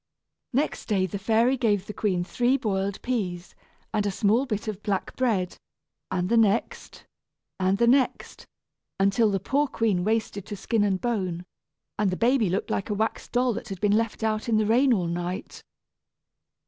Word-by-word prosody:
Next 280 +5 -1
day 195 -4 +2
the 190 +2 -5
fairy 225 +5 +3
gave 205 -6 +1
the 210 - -7
queen 185 -5 0
three 245 +8 +1
boiled 195 -4 -2
peas, 190 -8 -3 0.4
and 210 - +1
a - - +1
small 215 +7 +2
bit 215 -2 -3
of 210 -2 -4
black 200 -3 -2
bread, 210 -8 0 0.5
and 180 -1 -1
the 235 - +2
next, 225 0 0 0.5
and 190 +1 +2
the 235 - +3
next, 260 +2 +1 0.5
until 200 +3 +3
the 195 -1 0
poor 280 +9 +1
queen 215 -8 0
wasted 215 -1 -1
to 205 - -6
skin 220 +2 0
and 195 -2 +1
bone, 185 -7 -2 0.5
and 210 -2 +2
the 185 - -2
baby 235 -3 +3
looked 190 +3 -2
like 200 - -2
a 210 - 0
wax 220 +2 -2
doll 250 0 +1
that - - -6
had 195 -2 -6
been 205 +1 +3
left 225 0 -1
out 220 +1 -1
in 220 - +3
the 215 - +2
rain 250 +5 +4
all 190 -7 +2
night. 175 +2 -4
210 Hz, 180 wpm, -26 LUFS, 190-235 Hz, 0.5 s, rain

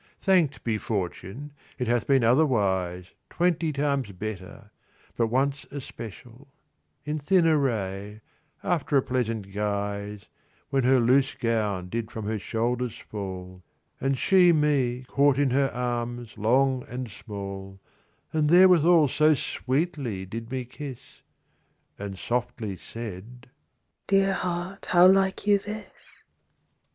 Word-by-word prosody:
Thanked 175 -8 +2
be 110 -2 -1
fortune, 105 +8 -4 0.2
it 125 - -2
hath 120 -1 +1
been 135 -3 +4
otherwise 100 - +1 0.2
Twenty 170 -2 +1
times 140 -5 -1
better; 105 +2 -7 0.4
but 115 - +1
once 135 +4 0
especial— 120 -1 -9 0.6
In 150 +1 -2
thin 175 +4 +3
array: 105 -9 0 0.4
after 155 -4 +1
a 135 - +3
pleasant 115 -6 -2
guise, 100 0 -3
10 - - -26 0.4
When 135 -2 +2
her 130 0 +5
loose 130 +3 +3
gown 105 -6 -1
did 115 +2 -3
from 110 -2 -6
her 110 0 -2
shoulders 120 +2 -2
fall, 95 -3 -7 0.4
And 135 0 0
she 180 +1 +5
me 135 -5 +1
caught 140 -1 +3
in 140 -2 +2
her 135 +1 +2
arms 120 -1 -3
long 130 +4 +2
and 125 +1 -5
small, 100 -2 -8 0.5
And 155 -2 +2
therewithal 175 -3 +6
so 155 +3 +4
sweetly 130 - -2
did 115 +4 -7
me 130 -1 -3
kiss, 135 0 -10 0.8
And 100 -1 -6
softly 120 -3 -3
said, 115 +5 -9 0.6
'Dear 195 0 +3
heart, 180 +1 -4
how 175 0 +6
like 190 +1 +4
you 205 -1 +4
this? 210 +2 -10
125 Hz, 125 wpm, -26 LUFS, 105-145 Hz, 0.8 s, therewithal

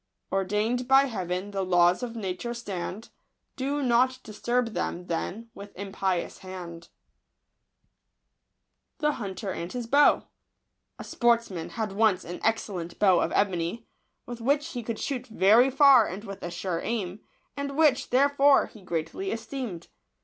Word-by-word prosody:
Ordain'd 210 +6 0
by 270 +1 +6
Heaven 190 -5 -3
the 195 -1 -2
laws 175 +1 +3
of 240 -2 -5
nature 210 +3 -4
stand; 205 -1 -6 0.5
Do 280 +2 -2
not 255 +1 +3
disturb 240 +3 -1
them, 180 -3 -3
then, 210 +7 -4
with 200 -1 -12
impious 195 -2 -2
hand. 175 -3 -9 2.1
38 245 -11 -2
?^unt*r 195 -4 -4
anto 245 +10 +2 0.8
SPORTSMAN 230 -8 0
had 220 -3 -3
once 200 -2 +2
an 175 - -6
excellent 195 -6 -2
bow 190 -4 +4
of - - 0
ebony, 195 +3 0 0.4
with 240 -1 -8
which 285 +4 +1
he 245 - -5
could 230 -1 -4
shoot 260 -3 -4
very 225 +4 +5
far 270 -4 +6
and 195 +4 -6
with 195 -3 -8
a 175 - -4
sure 175 0 -3
aim, 205 -4 -3 0.4
and 280 0 -4
which, 300 -5 +3
therefore, 280 +1 +4
he 215 - -15
greatly 175 - -3
esteemed. 230 - -5
220 Hz, 135 wpm, -27 LUFS, 185-250 Hz, 2.1 s, by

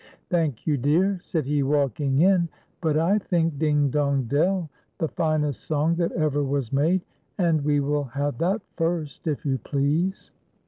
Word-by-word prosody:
" - - -40
Thank 160 -9 0
you, 150 -3 +1
dear," 175 +9 +2
said 160 -5 -2
he, 145 +1 +1
walking 140 0 +1
in; 180 -2 +4 0.2
" - - -41
but 155 -3 +1
I 180 +7 +3
think 165 -6 0
'Ding, 150 -3 +2
dong, 140 -2 +1
dell,' 160 +8 +1 0.3
the 160 - 0
finest 155 -4 -1
song 155 +2 +1
that 170 -1 0
ever 150 -3 +1
was 140 -3 -2
made, 165 +7 +2 0.4
and 165 -6 +2
we 145 0 +2
will 145 +1 0
have 140 +3 -3
that 190 +5 0
first, 165 -3 -2
if 150 -2 -2
}'ou 135 -2 0
please." 150 - -1
150 Hz, 175 wpm, -25 LUFS, 140-170 Hz, 0.4 s, in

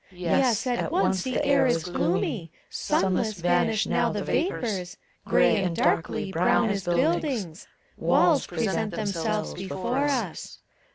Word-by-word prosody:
Yes, 210 +7 +1
at 245 +2 -1
once 315 - +1
the 260 +5 -1
air 280 -2 +4
is 165 -10 +1
gloomy, 175 0 -1 0.2
sunless 190 +3 0
vanish 175 +4 +1
now - - +1
the - - -3
vapors, 210 - -2 0.3
Gray - - +3
and 175 -2 -1
darkly, 195 +6 0
brown 190 +6 +2
as 195 -2 -3
buildings. 175 - -1 0.3
Walls - - +3
present 220 -1 -2
themselves 210 0 -2
before 195 +9 -2
us. 245 - -3
200 Hz, 125 wpm, -26 LUFS, 175-240 Hz, 0.3 s, air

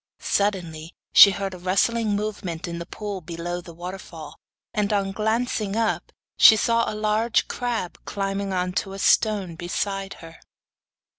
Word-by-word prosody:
Suddenly 175 -5 -2 0.2
she 200 - +10
heard 195 -1 -3
a 180 - -9
rustling 205 +4 +1
movement 195 -5 -4
in 170 0 -5
the 170 - -7
pool 205 -2 -6
below 175 +1 -5
the 170 - -12
waterfall, 175 -3 -9 0.3
and, 210 0 0
on 200 -2 0
glancing 220 0 -1
up, 225 -1 -1 0.3
she 220 - +9
saw 230 +2 +1
a - - -6
large 215 +2 +1
crab 235 -7 -3
climbing 195 0 -3
on 180 -1 -1
to 195 - -10
a - - -7
stone 195 -3 +2
beside 195 +3 -3
her. 165 -1 -13
195 Hz, 150 wpm, -24 LUFS, 175-215 Hz, 0.3 s, she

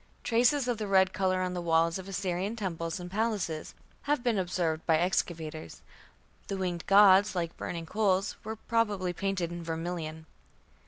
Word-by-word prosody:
Traces 245 +3 +3
of 240 -3 -1
the 210 - -3
red 190 -1 +4
colour 185 -1 +1
on 180 0 -2
the 180 - -3
walls 165 +1 +2
of 190 - -9
Assyrian 195 +2 -2
temples 170 -5 -3
and 180 0 -8
palaces 200 -7 -2 0.3
have 290 -4 +1
been 235 -5 +1
observed 175 -3 -1
by 160 -2 +5
excavators. 160 - -2 0.6
The 195 - -3
winged 180 -2 -3
gods 200 0 +6
"like 170 -2 -2
burning 170 -1 -5
coals" 195 0 +1
were 220 +1 -4
probably 210 -5 0
painted 190 -2 -2
in 170 0 -6
vermilion. 165 -1 -4
185 Hz, 160 wpm, -29 LUFS, 170-205 Hz, 0.6 s, gods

